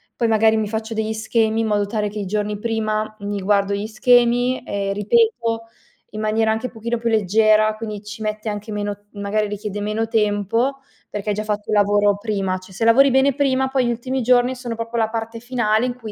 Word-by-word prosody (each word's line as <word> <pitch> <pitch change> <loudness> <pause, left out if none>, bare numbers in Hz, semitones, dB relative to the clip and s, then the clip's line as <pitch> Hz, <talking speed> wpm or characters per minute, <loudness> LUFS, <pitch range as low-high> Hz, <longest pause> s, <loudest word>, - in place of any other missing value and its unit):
Poi, 235 - 0
magari, 220 0 +4
mi 215 -1 0
faccio 220 +1 -4
degli 220 0 -1
schemi, 220 0 0
in 225 - 0
modo 205 -1 +1
tale 210 0 -2
che 210 - -9
i 205 - -3
giorni 210 +1 -2
prima 215 -1 -2
mi 205 0 -3
guardo 200 0 +1
gli 200 +1 -3
schemi 245 +3 +3
e 200 -1 -2
ripeto, 230 +2 +1 0.5
in 215 - -4
maniera 220 +1 +1
anche 220 +3 -1
pochino 235 +1 -3
più 235 +1 -3
leggera. 215 0 +3
Quindi, 215 -2 -6
ci 215 +1 -8
mette 215 +1 -3
anche 210 +1 -5
meno 205 -1 -4
magari 205 +1 -1
richiede 205 0 -5
meno 215 +2 -1
tempo, 225 +4 0 0.3
perché 205 0 -4
hai 205 - +1
già 210 - -2
fatto 210 -1 -3
un 215 - +1
lavoro 205 0 +3
prima. 200 -3 -2
Cioè, 185 +1 -14
se 195 - -3
lavori 260 +5 +6
bene 265 +2 +4
prima, 265 -1 +1
poi 265 -1 +1
gli - - 0
ultimi 255 +3 -3
giorni 250 +1 +3
sono 245 -2 -5
proprio 230 +1 -4
la 225 -1 +2
parte 225 0 -4
finale 235 -2 0
in 250 -1 -2
cui 225 -4 -8
220 Hz, 210 wpm, -21 LUFS, 210-230 Hz, 0.5 s, lavori